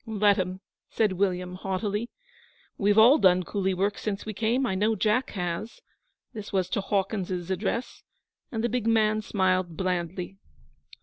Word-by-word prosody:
'Let 210 -2 +3
'em,' 185 +1 -3 0.3
said 215 -3 +1
William, 180 -1 -1
haughtily. 200 +4 -3 0.7
'We've 205 +1 +2
all 245 +8 +7
done 185 -1 +4
coolie 190 +1 -1
work 200 +3 0
since 205 -2 -3
we 215 - -4
came. 230 +6 +1
I 215 - -1
know 210 +4 +1
Jack 215 +5 +1
has.' 180 +5 -4 0.5
This 215 -3 -7
was 185 -2 0
to 210 - -1
Hawkins's 190 -2 -2
address, 205 +6 -2 0.5
and 225 -1 -2
the - - +3
big 240 -1 -1
man 215 -1 +3
smiled 185 -5 0
blandly. 180 +1 -3
200 Hz, 150 wpm, -27 LUFS, 185-220 Hz, 0.7 s, all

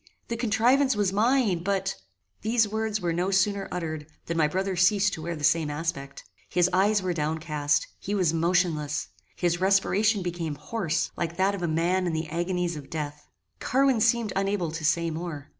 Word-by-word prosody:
The 235 - -1
contrivance 245 +4 +3
was 200 -2 +1
mine, 220 -4 +2
but 190 +1 -1 0.3
" 95 +1 -46
These 225 0 +2
words 220 0 -2
were 175 -3 -1
no 175 +3 0
sooner 195 +1 +1
uttered, 160 -4 -4 0.2
than 170 - -3
my 160 -2 +3
brother 190 +4 -1
ceased 200 +2 +3
to 160 - -5
wear 170 +1 -3
the 150 - -8
same 165 -1 +3
aspect. 145 -2 -4 0.3
His 175 0 +3
eyes 200 +2 +3
were 180 -1 0
downcast: 150 -2 0
he 205 - -3
was 180 -5 +2
motionless: 165 -3 0 0.3
his 175 0 0
respiration 195 +2 +2
became 170 -4 -3
hoarse, 165 +2 -2
like 170 0 -3
that 190 +2 +2
of 200 - -5
a 175 - 0
man 175 +3 +1
in 170 - -1
the 160 0 -3
agonies 175 +1 -1
of 145 -2 -9
death. 150 -2 -5 0.3
Carwin 265 -2 +2
seemed 230 -2 +2
unable 195 -4 0
to 160 0 -6
say 170 +1 +1
more. 160 -3 -6
180 Hz, 185 wpm, -26 LUFS, 160-200 Hz, 0.3 s, contrivance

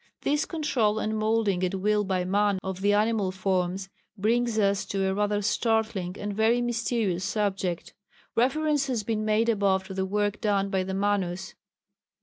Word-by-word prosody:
This 295 +1 +1
control 260 -10 0
and 220 0 -1
moulding 215 -4 +1
at 185 +1 0
will 210 +2 +1
by 185 -2 -1
man 200 +1 +2
of 190 0 -4
the 205 +1 +3
animal 210 -2 +2
forms 185 0 -1 0.3
brings 230 +3 +1
us 200 -2 +2
to 195 -1 -1
a 190 - +1
rather 205 +1 0
startling 220 -4 0
and 205 0 -4
very 225 +3 +3
mysterious 230 -6 -1
subject. 195 -3 -2 0.4
Reference 285 +3 +2
has 240 -5 -1
been 215 0 -1
made 215 +1 +2
above 200 -4 +2
to 190 - -8
the 190 0 -2
work 205 +1 -1
done 200 -2 +1
by 190 -2 +1
the 190 +1 -3
Manus. 190 -2 -1
205 Hz, 165 wpm, -27 LUFS, 190-220 Hz, 0.4 s, the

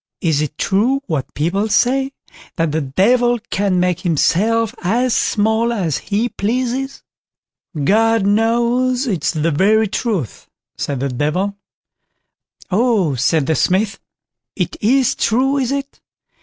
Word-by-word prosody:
Is 160 -4 +1
it 150 0 -4
true 245 +8 +1
what 145 -5 -3
people 195 +8 -1
say, 265 +5 +1 0.4
that 165 -2 0
the 160 +2 -1
Devil 240 - +2
can 195 -2 +1
make 180 -1 +1
himself 205 +7 +1
as 235 +7 +1
small 220 +2 +1
as 180 - -1
he 215 +3 -1
pleases?" 255 +5 -3 0.8
"God 225 +5 +3
knows, 235 +5 +1
it 185 - -2
is - - +1
the 160 +1 0
very 215 +8 +3
truth", 200 - -3 0.3
said 140 -3 -3
the 140 - -1
Devil. 155 +10 -1 1.2
"Oh!" 205 - +2
said 140 +4 +1
the 160 - +1
Smith; 195 +5 0 0.6
"it - - -2
is 255 +3 +3
true, 265 +5 +1
is 260 -1 -1
it? 280 0 -4
210 Hz, 130 wpm, -18 LUFS, 165-240 Hz, 1.2 s, God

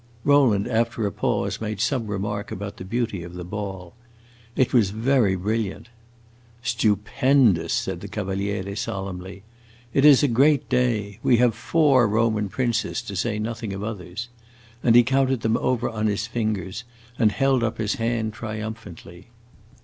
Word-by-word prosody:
Rowland, 130 -8 +4
after 115 -1 0
a 100 - -1
pause, - - -1
made 105 -2 -4
some 115 0 0
remark 105 0 -3
about 100 +1 -6
the - - -7
beauty 115 -1 -2
of 85 +1 -9
the 90 - -6
ball. 95 -2 -6 0.6
It 130 - +1
was 115 -6 +4
very 110 -1 +2
brilliant. 110 +3 -3 0.7
"Stupendous!" 115 - +2
said 85 - -2
the 100 - -7
Cavaliere, 100 -1 -3
solemnly. 95 -1 -5 0.5
"It 135 - +3
is 145 -1 +7
a - - +5
great 135 +2 +3
day. 115 -5 0
We 120 - +4
have 120 -1 +3
four 135 0 +3
Roman 110 -1 +1
princes, 120 0 -1
to 105 -4 -7
say 105 +3 -1
nothing 110 -1 -4
of 100 +1 -5
others." 105 0 -5 0.5
And 115 -2 +4
he 120 - +8
counted 130 -1 +1
them 110 0 +1
over 125 -1 0
on 110 -1 -1
his 105 0 -1
fingers 110 -3 -3 0.4
and 110 -3 +4
held 135 +1 +2
up 115 - -1
his 105 -2 -1
hand 115 -2 -1
triumphantly. 110 -5 -8
110 Hz, 155 wpm, -24 LUFS, 100-120 Hz, 0.7 s, he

